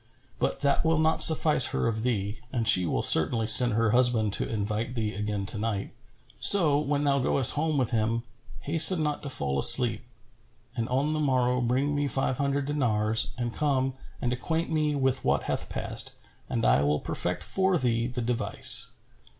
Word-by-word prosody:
But - - -3
that 140 - 0
will 165 0 0
not 160 +1 +1
suffice 155 -4 +5
her - - -3
of 110 -1 -3
thee 105 -3 -4
and 115 -4 -3
she 90 -5 +4
will - - -3
certainly 110 +8 +3
send 120 +2 +6
her 115 0 0
husband 120 -4 +1
to - - -3
invite 110 +3 -4
thee 110 -3 -4
again 105 0 -5
to 105 - -2
night; 105 -2 -5 0.5
so, 160 -8 +5
when 145 -1 -2
thou 140 -1 0
goest 130 -1 +4
home 155 0 -2
with 125 -4 -2
him, 115 0 -2 0.4
hasten 165 +2 +5
not 150 -1 -4
to 140 - -8
fall 70 - -2
asleep, - - +4 0.7
and 115 -2 -4
on 140 +5 -1
the 155 - -3
morrow 125 -3 -1
bring 130 +4 -1
me 145 0 -2
five 135 -2 -3
hundred 140 0 -2
dinars 115 -6 -2
and 120 -1 -5
come 135 -3 -2 0.3
and 125 0 -3
acquaint 160 +7 -4
me 155 -2 -1
with 130 -1 -2
what - - -1
hath - - -5
passed, - - -4 0.4
and - - -3
I - - +2
will 75 +1 -1
perfect - - -5
for 190 -1 -1
thee 115 -4 -2
the 125 0 -5
device." 120 0 +2
125 Hz, 180 wpm, -25 LUFS, 110-145 Hz, 0.7 s, send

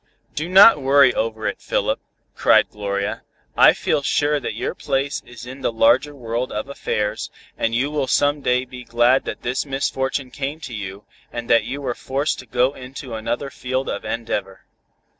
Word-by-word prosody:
"Do 155 +3 -3
not 190 -3 +8
worry 135 -1 +5
over 110 -1 -2
it, - - -2
Philip," - - 0 0.4
cried - - +4
Gloria, 100 -1 -3 0.3
"I - - +7
feel - - 0
sure 145 +1 +1
that - - -4
your - - -3
place 135 0 -2
is 120 -1 -10
in 130 +2 -9
the 130 - 0
larger 125 +6 +3
world 120 0 -3
of 105 +5 -4
affairs, 105 -6 -2 0.3
and 115 0 -1
you 135 +5 0
will 145 -3 -1
some 145 +2 +2
day 125 0 +1
be 125 0 -10
glad 120 +2 +3
that - - -6
this 125 +2 -1
misfortune 135 -1 -2
came 140 +3 -4
to 130 -5 -7
you, 100 -1 -6 0.3
and 120 -1 -5
that 115 - +5
you 140 +2 -5
were 130 -3 -2
forced 135 +5 -2
to - - -11
go 125 +2 +2
into 130 -1 -9
another 120 +5 -3
field 130 +1 -3
of 100 - -4
endeavor. 100 -4 -4
130 Hz, 180 wpm, -21 LUFS, 115-140 Hz, 0.4 s, not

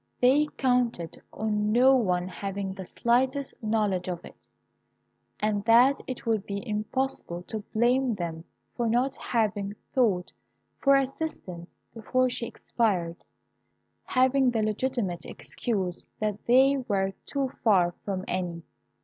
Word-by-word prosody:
They 275 +5 +4
counted 245 - 0
on 210 -1 -1
no 255 +4 +6
one 180 -7 +1
having 195 +1 -4
the 190 -1 -8
slightest 260 +7 +1
knowledge 210 -5 0
of 175 -2 -5
it, - - -15 0.9
and 210 -1 0
that 245 +4 +6
it 255 -1 -6
would 220 -3 +1
be 200 +4 -4
impossible 210 -4 -2
to 220 - -5
blame 245 +2 +2
them 165 -3 -5 0.3
for 235 -2 0
not 250 +4 +1
having 205 -3 -1 0.2
sought 205 -9 +2 0.5
for 275 0 +5
assistance 265 - -3 0.2
before 255 +3 +1
she 235 - -2
expired, 180 -8 -1 0.9
having 260 0 +3
the 225 -3 0
legitimate 215 -5 -1
excuse 190 -7 -4
that 210 -1 -3
they 265 +3 +5
were 195 -6 -1
too 275 -2 -1
far 190 -7 +5
away 175 - -15
from 190 -2 -3
any. 175 -2 -3
220 Hz, 130 wpm, -27 LUFS, 190-255 Hz, 0.9 s, no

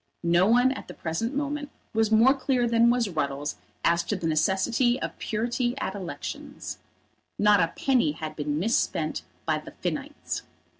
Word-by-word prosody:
No 170 +2 +4
one 245 +3 +5
at 270 - -6
the - - -9
present 225 - -2
moment 290 0 -2 0.2
was 220 -1 +2
more 230 +5 +6
clear 255 -3 +1
than 230 0 +4
was 240 -2 +2
Ruddles 145 -4 -2 0.3
as 170 0 +4
to 205 - -1
the 175 - -4
necessity 195 +10 +2
of - - -5
purity 240 +3 -1
at - - -2
elections. 185 -4 -6 0.6
Not 210 0 +5
a 165 -1 +2
penny 250 - +2
had 155 0 -6
been 150 -1 -2
misspent 225 - 0 0.2
by - - +1
the - - -11
Finnites. - - -3
220 Hz, 160 wpm, -27 LUFS, 170-245 Hz, 0.6 s, more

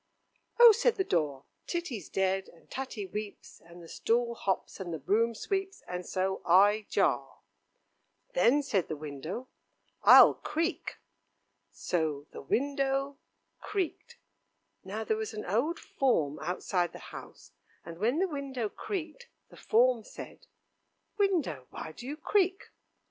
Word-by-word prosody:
"Oh!" 475 -1 +11
said 470 +2 +2
the 385 - +1
door, 150 - -1 0.2
"Titty's 280 - -4
dead, 190 0 0
and 170 - -21
Tatty 260 -6 -4
weeps, 205 +2 -7
and 170 +1 -14
the - - -11
stool 235 +6 0
hops, 195 -4 -2
and 180 -3 -5
the 165 - -3
broom 225 +9 +1
sweeps, 390 - -3
and 180 0 -5
so 190 0 -1
I 205 +4 +5
jar." 140 -8 0 0.9
"Then," 250 +11 +4
said 200 -10 0
the 155 - -3
window, 155 - -6 0.5
"I'll - - +9
creak." 330 +3 -3 0.7
So 155 -4 -2
the - - -8
window 275 - 0 0.4
creaked. 390 -6 -4 0.7
Now 205 +3 -4
there 220 0 0
was 220 0 -4
an 215 - -5
old 250 - 0
form 155 - 0
outside 180 -1 -1
the - - -11
house, - - -11 0.3
and 170 0 -9
when 235 +8 +1
the 380 +3 +2
window 275 - -3
creaked, 390 - -6 0.2
the - - -15
form 240 0 +3
said: - - -11 0.7
"Window, 325 - +1
why - - -7
do 245 +10 -10
you 295 +2 -4
creak?" 380 +2 0
220 Hz, 140 wpm, -30 LUFS, 180-285 Hz, 0.9 s, Oh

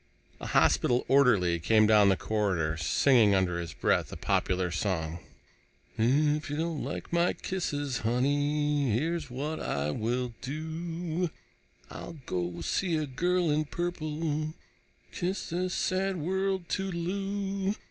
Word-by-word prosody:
A - - -6
hospital 120 0 +3
orderly 105 -11 +4
came 110 +6 +4
down 105 -2 +6
the 95 - +3
corridor, 95 -8 0
singing 105 - +4
under 90 -2 +1
his 85 -2 -5
breath - - +1
a - - -6
popular 90 -1 0
song: 85 -2 -2 0.8
If 145 +6 +2
you 145 - -3
don't 160 -2 -2
like - - -5
my 170 +1 +3
kisses, 145 -8 -3
honey, 145 +3 +1
Here's 160 +1 -2
what 145 +5 -3
I 70 +1 -1
will 120 +6 -2
do: 165 +4 -3 0.6
I'll 170 - -8
go 85 -1 -3
see 170 - 0
a 155 - -1
girl 170 +5 +1
in 155 +1 +1
purple, 155 -2 -3 0.6
Kiss 185 0 -3
this 180 +1 -1
sad 190 0 0
world 190 +2 -1
toodle 175 -3 -2
oo. 195 +1 -2
150 Hz, 130 wpm, -29 LUFS, 110-170 Hz, 0.8 s, down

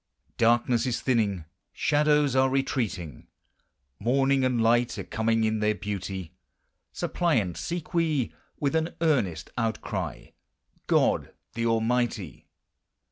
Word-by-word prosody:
Darkness 120 +1 +3
is 120 - -1
thinning; 105 -9 0 0.3
shadows 150 -2 +2
are 130 0 +4
retreating; 115 - -2 0.7
Morning 135 +4 +2
and 125 -2 +1
light 120 +1 +2
are - - -4
coming 115 0 0
in 110 0 +1
their 105 0 +1
beauty; 95 -4 -5 0.6
Suppliant 120 - 0
seek 175 0 -5
we. 155 -7 +1 0.3
with 145 +1 0
an 160 +1 0
earnest 110 - +1
outcry, 115 -1 -3 0.6
God - - +2 0.2
the 115 0 -1
Almighty 115 - -1
120 Hz, 110 wpm, -27 LUFS, 105-135 Hz, 0.7 s, are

